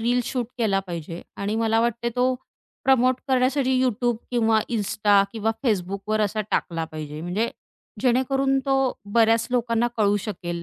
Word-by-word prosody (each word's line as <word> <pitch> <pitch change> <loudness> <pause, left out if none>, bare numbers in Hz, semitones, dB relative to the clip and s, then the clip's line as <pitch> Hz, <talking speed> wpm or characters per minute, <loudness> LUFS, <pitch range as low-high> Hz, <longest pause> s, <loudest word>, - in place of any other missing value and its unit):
reel 240 +2 +2
shoot 245 -1 -2
केला 205 -4 +2
पाहिजे 170 -1 -6
आणि 205 +2 -2
मला 225 0 +2
वाटते 235 0 0
तो 255 +1 +2 0.5
प्रमोट 255 -1 +4
करण्यासाठी 260 0 +2
YouTube 240 -1 +1
किंवा 225 -2 +3
Insta 205 -2 +3
किंवा 225 -1 0
Facebookवर 200 0 0
असा 215 +1 0
टाकला 165 -2 -1
पाहिजे, 155 -1 -7
म्हणजे 185 +7 -1 0.5
जेणेकरून 270 +2 +2
तो 270 - +2 0.4
बऱ्याच 225 0 +4
लोकांना 235 -1 +1
कळू 205 -2 +3
शकेल 175 -5 -5
225 Hz, 140 wpm, -24 LUFS, 200-250 Hz, 0.5 s, प्रमोट